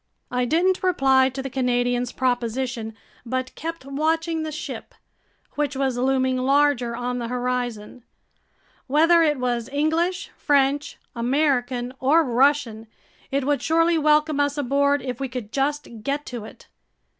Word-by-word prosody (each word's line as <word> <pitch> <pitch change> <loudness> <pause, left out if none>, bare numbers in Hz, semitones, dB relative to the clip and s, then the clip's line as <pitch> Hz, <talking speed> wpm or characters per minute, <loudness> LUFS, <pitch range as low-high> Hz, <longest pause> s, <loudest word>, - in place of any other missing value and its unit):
I 250 0 0
didn't 355 +7 +2
reply 270 -8 +3
to 265 +1 -6
the 270 - -4
Canadian's 245 -1 0
proposition 245 -2 -2 0.3
but 255 +1 -3
kept 330 -3 -6
watching 320 +4 -1
the 315 0 -4
ship, 310 +3 -7 0.6
which 290 -1 -2
was 265 -2 0
looming 260 +1 +1
larger 260 -2 +2
on 245 +1 -3
the 235 - -3
horizon. 245 -2 -3 0.8
Whether 325 +5 +5
it 300 -3 +2
was 245 -1 -2
English, 330 +6 0
French, 285 0 +1 0.2
American, 250 -1 0
or 300 +6 +4
Russian, 250 -4 +1 0.4
it 275 -1 -1
would 285 -2 +1
surely 330 +2 +2
welcome 300 0 +3
us 285 0 +1
aboard 280 0 +1
if 250 -3 -4
we 270 -1 -3
could 240 -4 -6
just 290 +2 -1
get 280 +5 -2
to 240 -4 -6
it. - - -14
270 Hz, 140 wpm, -23 LUFS, 245-295 Hz, 0.8 s, Whether